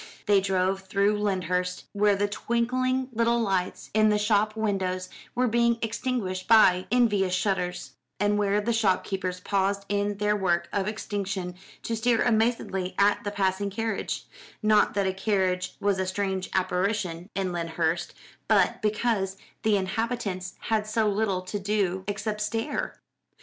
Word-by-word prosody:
They 205 -2 +4
drove 190 0 0
through 200 +2 +1
Lyndhurst, 180 -2 -1
where 205 0 +3
the 205 +1 +1
twinkling 255 +4 0
little 235 +1 +2
lights 190 -5 -1
in 215 0 +4
the 210 - +3
shop 210 0 +2
windows 190 -4 -1 0.3
were 250 +1 +2
being 235 0 +2
extinguished 225 -5 -2
by 185 -5 +6
envious 205 -7 +3
shutters, 180 -2 -1 0.3
and 205 +1 +2
where 205 0 +2
the 235 +3 0
shop 210 -5 +2
keepers 185 -2 -3
paused 200 +1 0
in 205 0 0
their 210 0 +1
work 175 -4 +1
of 200 -1 0
extinction 200 -4 -3 0.3
to 230 - -2
stare 230 +1 +2
amazedly 220 -5 0
at 205 +3 +3
the 205 - -2
passing 200 0 0
carriage; 225 +1 -3 0.4
not 215 -1 +4
that 200 -1 +1
a 190 - 0
carriage 190 -2 0
was 200 -1 +1
a 190 - -1
strange 190 -1 -2
apparition 185 -1 -1
in 190 -2 -1
Lyndhurst, 170 0 -1 0.3
but - - +3
because 210 -3 0 0.2
the 215 -2 +3
inhabitants 195 -2 -2
had 215 -2 0
so 215 0 +1
little 200 -3 0
to 205 +3 -4
do 195 -2 0
except 210 +1 -3
stare. 225 +7 -2
200 Hz, 150 wpm, -27 LUFS, 185-215 Hz, 0.4 s, by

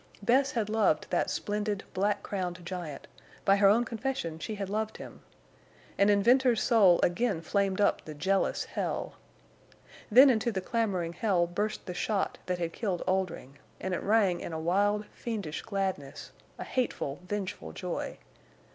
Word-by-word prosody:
Bess 265 +6 +3
had 225 -4 0
loved 215 -8 +2
that - - +1
splendid, 210 -1 -2
black 205 +2 0
crowned 180 -3 -4
giant—by 180 +2 -3
her 200 0 +5
own 225 +4 +4
confession 225 -9 -3
she 215 +6 -4
had 200 -1 -4
loved 215 +2 -2
him; - - -10 0.7
and 200 +1 +4
in 200 -1 +4
Venters's 245 0 +4
soul 200 -8 +5
again 195 +1 +1
flamed 195 +3 0
up 205 - +2
the 155 - -8
jealous 190 +6 +1
hell. - - -3 1.0
Then 260 +5 +8
into 235 0 0
the 195 - -2
clamoring 185 -5 -1
hell 180 -1 +2
burst 205 +5 -3
the 180 - -5
shot 200 +2 -1
that 180 -1 0
had 170 -1 -3
killed 195 -6 -2
Oldring, 180 -7 -2 0.2
and 190 - -3
it 180 - -1
rang 200 -4 +3
in 170 - -6
a 160 - -3
wild 205 +5 +1
fiendish 205 -10 -4
gladness, 190 -9 -4 0.3
a - - -5
hateful, 235 - -2
vengeful 190 - -4
joy. - - -4
200 Hz, 155 wpm, -29 LUFS, 175-215 Hz, 1.0 s, Then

